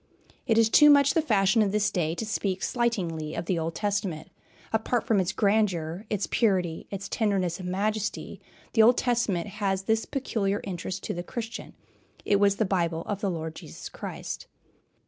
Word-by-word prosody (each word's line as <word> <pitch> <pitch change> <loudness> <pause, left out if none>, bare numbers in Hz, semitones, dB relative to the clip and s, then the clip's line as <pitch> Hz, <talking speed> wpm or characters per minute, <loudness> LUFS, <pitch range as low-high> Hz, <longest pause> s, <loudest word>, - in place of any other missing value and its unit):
It 225 -3 +3
is 225 -1 +6
too 295 +6 +7
much 280 -1 +6
the 325 - +3
fashion 210 -6 +3
of 205 -2 +2
this 210 0 +1
day 165 -2 -1
to 225 - -3
speak 195 -3 -2
slightingly 180 - -1
of 165 - -3
the 175 -1 0
Old 165 +1 -3
Testament. 200 -6 -2 0.4
Apart 225 +2 +1
from 215 -3 +3
its 185 0 0
grandeur, 200 -3 0
its 205 -2 -1
purity, 185 -7 0
its 200 0 -5
tenderness 195 -5 0
and 180 -1 -5
majesty, 210 +2 -2 0.3
the 225 - +5
Old 235 +3 +6
Testament 230 -8 +1 0.2
has 195 -1 0
this 220 +2 +1
peculiar 210 -7 -1
interest 185 0 -5
to - - -3
the 175 - -4
Christian, 225 +5 -6 0.5
it 200 - +3
was 200 -1 +4
the 220 - +1
Bible 170 -4 0
of 205 -1 -3
the 200 - 0
Lord 160 -2 -4
Jesus - - -9
Christ. - - -6
200 Hz, 180 wpm, -27 LUFS, 180-220 Hz, 0.5 s, too